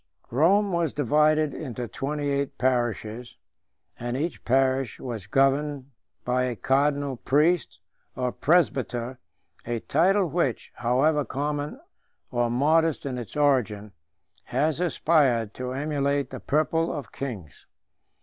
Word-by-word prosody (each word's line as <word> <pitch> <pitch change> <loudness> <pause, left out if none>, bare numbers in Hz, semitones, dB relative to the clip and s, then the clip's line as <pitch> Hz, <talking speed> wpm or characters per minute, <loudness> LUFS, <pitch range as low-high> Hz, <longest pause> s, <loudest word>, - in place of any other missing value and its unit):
Rome 190 - +3
was 170 -4 0
divided 150 +2 +2
into 125 -5 -5
twenty 145 +4 -3
eight 140 0 -2
parishes, 120 -2 -1 0.6
and 120 +1 -3
each 160 +4 -3
parish 130 -1 +1
was 115 -7 -6
governed 135 +2 +1 0.3
by 125 +1 +1
a 125 -2 -2
cardinal 140 +2 +1
priest, 145 - +1 0.4
or 125 -1 -1
presbyter, 130 -6 +1 0.4
a 120 -1 -2
title 185 +5 +2
which, 150 -6 -1
however 135 +5 +2
common 145 - -3 0.5
or 120 -2 +1
modest 155 +6 +2
in 130 -3 -3
its 120 +5 -8
origin, 115 -8 +1 0.5
has 155 0 0
aspired 145 -10 +2
to 125 0 -5
emulate 140 -1 -1
the - - -6
purple 155 +3 +1
of 140 -8 -6
kings. 100 - -7
135 Hz, 120 wpm, -26 LUFS, 125-150 Hz, 0.6 s, Rome